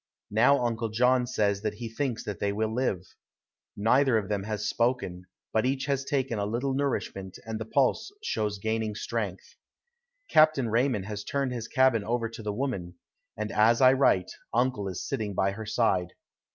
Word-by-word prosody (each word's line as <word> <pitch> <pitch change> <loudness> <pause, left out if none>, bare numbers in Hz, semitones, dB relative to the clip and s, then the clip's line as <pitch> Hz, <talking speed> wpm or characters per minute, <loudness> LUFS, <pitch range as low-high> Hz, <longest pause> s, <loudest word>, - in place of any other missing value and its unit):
Now 125 +4 +4
Uncle 115 -1 -1
John 125 +3 +3
says 100 -4 0
that 105 -1 -2
he 115 +1 -6
thinks 120 +1 -3
that 105 - -5
they 100 - 0
will 110 +2 -1
live. 115 -7 0 0.7
Neither 125 +4 +4
of 105 -2 -2
them 100 -2 -1
has 105 -1 -2
spoken, 115 -7 -1 0.3
but 110 - +2
each 135 +1 0
has 140 -1 0
taken 135 -5 -1
a 100 - 0
little 125 +5 -1
nourishment 120 -9 -2
and 110 -1 -4
the 110 - -4
pulse 135 - +1
shows 105 - -1
gaining 110 +1 -2
strength. 105 -4 -4 0.7
Captain 155 -6 +4
Raymond 115 -3 +1
has 105 0 -5
turned 140 -2 -1
his 120 -3 -4
cabin 130 -5 +3
over 115 +2 -1
to 115 0 -9
the 105 -1 -3
woman, 100 -7 -3 0.4
and 110 0 -3
as 115 +2 +4
I 130 -1 +7
write 115 -9 +3 0.2
uncle 120 -4 0
is 95 -3 -5
sitting 105 -3 -3
by 95 +1 +2
her 110 +2 -7
side. 95 -6 +1
110 Hz, 180 wpm, -28 LUFS, 105-130 Hz, 0.7 s, I